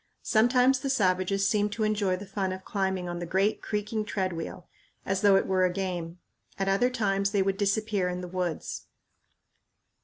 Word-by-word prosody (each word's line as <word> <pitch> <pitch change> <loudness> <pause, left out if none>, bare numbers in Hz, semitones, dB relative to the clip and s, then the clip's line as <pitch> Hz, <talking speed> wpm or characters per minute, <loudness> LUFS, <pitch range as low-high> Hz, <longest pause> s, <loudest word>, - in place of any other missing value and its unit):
Sometimes 250 +4 +4
the 275 +1 -3
savages 195 -4 +2
seemed 210 0 +1
to 220 +1 -2
enjoy 210 -3 +1
the 195 +3 -8
fun 195 -1 -2
of 185 0 -7
climbing 190 -3 -1
on 175 0 -4
the 175 - -4
great 195 +5 +1
creaking 210 +1 -2
treadwheel, 185 -4 -4 0.4
as 190 0 -1
though 200 -2 +6
it 195 - +3
were 185 -1 +2
a 180 - +3
game. 180 -2 -4 0.4
At 195 - -1
other 200 +6 +3
times 200 -5 0
they 200 -1 +2
would 195 0 0
disappear 200 -1 0
in 180 0 -4
the 180 - -6
woods. 180 -2 -4
195 Hz, 180 wpm, -28 LUFS, 185-210 Hz, 0.4 s, though